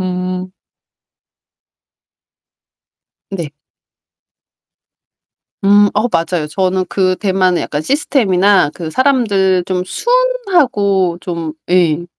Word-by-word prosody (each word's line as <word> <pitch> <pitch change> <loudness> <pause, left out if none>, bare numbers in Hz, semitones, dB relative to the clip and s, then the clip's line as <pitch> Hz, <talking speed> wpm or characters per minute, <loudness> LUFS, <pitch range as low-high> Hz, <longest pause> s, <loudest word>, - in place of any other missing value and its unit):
음. 185 0 -4 2.8
네. 170 -6 -5 2.1
음 205 +1 +5
어 215 +4 +1
맞아요. 165 -1 -1
저는 185 +3 -1
그 185 -1 +1
대만의 185 -3 0
약간 145 - -3
시스템이나 200 - +2
그 165 -3 -7
사람들 200 - +1
좀 180 -1 -2
순하고 345 - +1
좀 165 -3 -5 0.2
예. 175 -2 +2
185 Hz, 150 characters per minute, -15 LUFS, 180-205 Hz, 2.8 s, 음